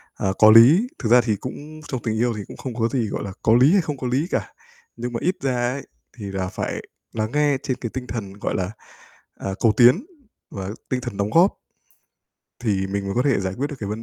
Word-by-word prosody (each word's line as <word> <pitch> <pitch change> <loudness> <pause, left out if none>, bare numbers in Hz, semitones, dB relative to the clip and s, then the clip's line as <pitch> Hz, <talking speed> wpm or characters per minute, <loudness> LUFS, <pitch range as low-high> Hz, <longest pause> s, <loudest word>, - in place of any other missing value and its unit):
à, - - -2
có 110 0 +8
lý, 135 - +7
thực 115 - -2
ra 125 +1 +7
thì 115 -3 0
cũng 150 +8 -8
trong 130 -3 -4
tình 110 -2 -1
yêu 120 +2 +1
thì 105 - -5
cũng - - -11
không 130 -3 -6
có 115 -1 +1
gì, 120 -2 -1
gọi - - -4
là, 100 - -5
có 110 - +3
lý 130 +5 +6
hay 200 - +5
không 150 -4 -4
có 130 - -4
lý 135 +7 0
cả, - - -2 0.4
nhưng 120 0 -5
mà 115 - -2
ít 185 +2 +1
ra 125 -2 0
ấy 140 - -7 0.3
thì 105 - -7
là 95 -1 -2
phải - - -4 0.4
lắng 110 0 -2
nghe 145 -1 +2
trên 130 -3 -2
cái 120 - -5
tinh 130 -1 -5
thần, 100 -6 -5
gọi 100 - -3
là, 95 +1 -2 0.7
à, - - -4
cầu 115 - +4
tiến 125 - +6 0.5
và 95 -1 -5 0.2
tinh 130 -1 -1
thần 120 -5 -6
đóng 100 0 0
góp 175 - +4 1.0
thì 100 -5 0
mình 100 +1 -3
mới 100 0 -3
có 125 - +2
thể 135 -6 +2
giải 95 -1 -3
quyết 140 - 0
được 145 - -6
cái 100 - -5
vấn 110 +2 -4
120 Hz, 250 wpm, -22 LUFS, 105-135 Hz, 1.0 s, có